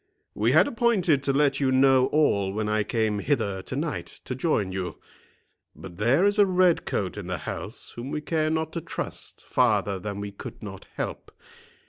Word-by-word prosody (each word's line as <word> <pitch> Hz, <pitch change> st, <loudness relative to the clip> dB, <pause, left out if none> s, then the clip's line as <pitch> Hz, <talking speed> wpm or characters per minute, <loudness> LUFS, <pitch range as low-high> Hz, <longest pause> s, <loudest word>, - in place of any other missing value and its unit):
We 115 Hz, +4 st, +1 dB
had 160 Hz, -, +6 dB
appointed 205 Hz, -, +2 dB
to 140 Hz, -, +1 dB
let 140 Hz, 0 st, +2 dB
you 135 Hz, -2 st, +2 dB
know 130 Hz, 0 st, +5 dB
all 100 Hz, -11 st, +2 dB
when 105 Hz, +1 st, -2 dB
I 105 Hz, 0 st, +1 dB
came 110 Hz, -1 st, 0 dB
hither 100 Hz, -7 st, 0 dB
to 125 Hz, -, -6 dB
night 150 Hz, +2 st, -3 dB, 0.2 s
to -, -, -3 dB
join 125 Hz, -, 0 dB
you. 90 Hz, -3 st, -4 dB, 0.8 s
But 90 Hz, -3 st, -11 dB
there 125 Hz, -, +3 dB
is 205 Hz, +1 st, +2 dB
a 205 Hz, -, +8 dB
red 180 Hz, -2 st, +3 dB
coat 95 Hz, 0 st, -2 dB
in 100 Hz, -4 st, -6 dB
the 90 Hz, -1 st, -2 dB
house -, -, -7 dB
whom 120 Hz, +3 st, -6 dB
we 150 Hz, -, -2 dB
care 155 Hz, +1 st, 0 dB
not 160 Hz, 0 st, -1 dB
to 170 Hz, -, -3 dB
trust -, -, -7 dB
farther 105 Hz, -5 st, +2 dB
than 100 Hz, +2 st, -5 dB
we 100 Hz, 0 st, -5 dB
could 100 Hz, -, -10 dB
not -, -, -8 dB
help. -, -, -5 dB
130 Hz, 190 wpm, -26 LUFS, 100-155 Hz, 0.8 s, a